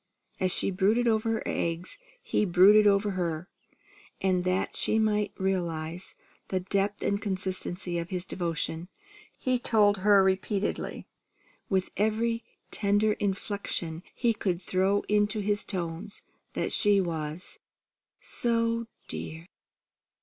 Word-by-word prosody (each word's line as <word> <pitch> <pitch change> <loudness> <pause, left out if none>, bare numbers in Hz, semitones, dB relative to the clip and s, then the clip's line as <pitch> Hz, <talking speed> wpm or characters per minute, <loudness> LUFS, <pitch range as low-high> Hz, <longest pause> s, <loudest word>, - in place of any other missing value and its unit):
As 185 0 +1
she - - +1
brooded 210 +6 +2
over 220 0 +2
her 225 - -1
eggs, 170 - -2 0.2
he - - +1
brooded 205 +3 +6
over 200 +1 +3
her; 175 -2 -2 0.7
and 185 -2 +1
that 185 +1 0
she 220 - +1
might 210 -1 +1
realize 175 -2 -2 0.3
the 190 - 0
depth 200 +2 -1
and 200 0 0
constancy 185 -3 0
of 170 +1 -5
his 180 -1 -2
devotion, 170 -1 -3 0.5
he 255 -1 0
told 210 -4 +3
her 200 0 +5
repeatedly, 190 +2 -1 0.6
with 190 -1 0
every 225 +2 +1 0.3
tender 205 +1 +2
inflection 195 -5 -3
he 235 -2 +2
could 185 -5 -1
throw 190 +2 +1
into 210 +1 +1
his 205 0 0
tones, 180 +2 -4 0.3
that - - -1
she 205 -2 +5
was 165 -2 -4 0.6
"So 230 -1 0 0.2
dear! 160 +1 -6
195 Hz, 120 wpm, -28 LUFS, 180-210 Hz, 0.7 s, brooded